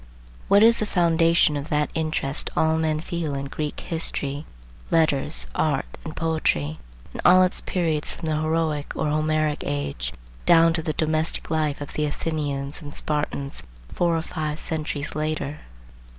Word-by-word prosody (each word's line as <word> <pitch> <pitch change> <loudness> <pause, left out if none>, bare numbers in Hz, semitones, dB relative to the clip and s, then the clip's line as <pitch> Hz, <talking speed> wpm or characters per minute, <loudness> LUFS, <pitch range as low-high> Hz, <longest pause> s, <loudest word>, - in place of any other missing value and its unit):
What 200 +1 +6
is 230 +1 +6
the 215 - -1
foundation 165 -4 +3
of 145 +2 -4
that 150 -1 +1
interest 155 -3 -1
all 160 0 +3
men 155 -1 0
feel 165 -4 -3
in 140 0 -3
Greek 150 +2 -4
history, 150 -3 -2 0.4
letters, 140 - +2
art, - - 0
and 155 - -7
poetry, 80 - 0 0.3
in - - -5
all 185 +1 +7
its 185 - 0
periods 160 -5 +1
from - - -6
the 155 -1 0
Heroic 155 -2 0
or 155 - 0
Homeric 155 0 +1
age 70 -4 -3 0.4
down 165 -1 +6
to 165 - 0
the 155 -1 -2
domestic 155 +1 0
life 155 -2 0
of 145 - -6
the 150 - 0
Athenians 145 -2 -3
and 145 -2 -9
Spartans, 145 - -2 0.3
four 170 -1 +2
or 160 - -2
five 155 -3 -3
centuries 155 -3 -3
later? 155 -1 -2
155 Hz, 155 wpm, -24 LUFS, 145-165 Hz, 0.4 s, all